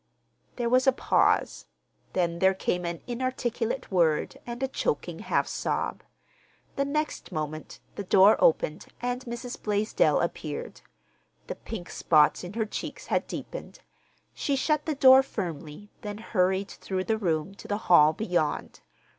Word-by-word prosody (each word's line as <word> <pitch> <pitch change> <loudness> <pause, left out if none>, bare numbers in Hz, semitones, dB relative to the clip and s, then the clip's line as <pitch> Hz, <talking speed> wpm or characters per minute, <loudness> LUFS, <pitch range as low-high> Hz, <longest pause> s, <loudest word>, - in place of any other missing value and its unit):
There 240 -1 -1
was 255 +2 +3
a - - +8
pause, 255 - +1 0.5
then 170 -2 0
there 190 +1 +4
came 180 -1 -1
an 170 0 -4
inarticulate 245 -1 -2
word 165 -5 +1
and 240 +2 -5
a - - +2
choking 450 - -2
half - - 0
sob. - - -2 0.7
The 275 - 0
next 300 +2 -3
moment 155 0 -5
the 205 - -5
door 195 +2 +6
opened - - +2
and 245 +1 -2
Mrs. 240 +1 -6
Blaisdell 210 +1 +2
appeared. - - -4 0.6
The - - -4
pink 185 -6 -8
spots 150 0 +3
in 180 +2 -7
her 220 0 -1
cheeks 215 - -6
had - - +1
deepened. - - -7 0.6
She 280 - -1
shut 300 +3 0
the 310 - 0
door 265 -1 +8
firmly, 175 - -6
then 205 -1 -5
hurried 190 -3 0
through 185 -1 -4
the 220 +2 -1
room 170 -2 -1
to - - -12
the 205 - -1
hall 155 -3 +7
beyond. 175 -4 -2
210 Hz, 145 wpm, -27 LUFS, 180-250 Hz, 0.7 s, a